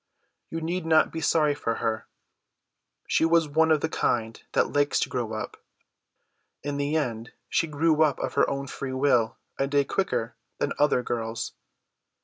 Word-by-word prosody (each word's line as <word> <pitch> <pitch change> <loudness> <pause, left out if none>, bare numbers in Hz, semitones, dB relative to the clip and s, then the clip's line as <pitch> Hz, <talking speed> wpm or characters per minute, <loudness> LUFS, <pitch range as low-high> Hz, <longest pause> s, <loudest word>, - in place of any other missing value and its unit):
You 165 - -4
need 175 +2 -2
not 160 -1 +4
be 165 - -4
sorry 155 -2 +3
for 115 -5 -2
her. 110 -1 -2 1.0
She - - +2
was 165 -1 +4
one 160 +2 +3
of 155 -2 +3
the - - +1
kind 115 -7 -1
that - - +2
likes 145 0 +2
to - - 0
grow 115 -3 -2
up. 110 - -6 1.0
In 145 0 -3
the 145 +2 -1
end 115 -6 -3 0.2
she 165 - +1
grew 155 +1 +2
up 150 -3 +4
of - - -3
her - - +3
own 140 0 -2
free 135 -1 -5
will 130 -4 +2 0.2
a 135 - +2
day 140 0 +3
quicker 120 -11 -1 0.2
than - - -1
other 145 -4 +3
girls. 115 -1 -3
145 Hz, 170 wpm, -26 LUFS, 120-160 Hz, 1.0 s, not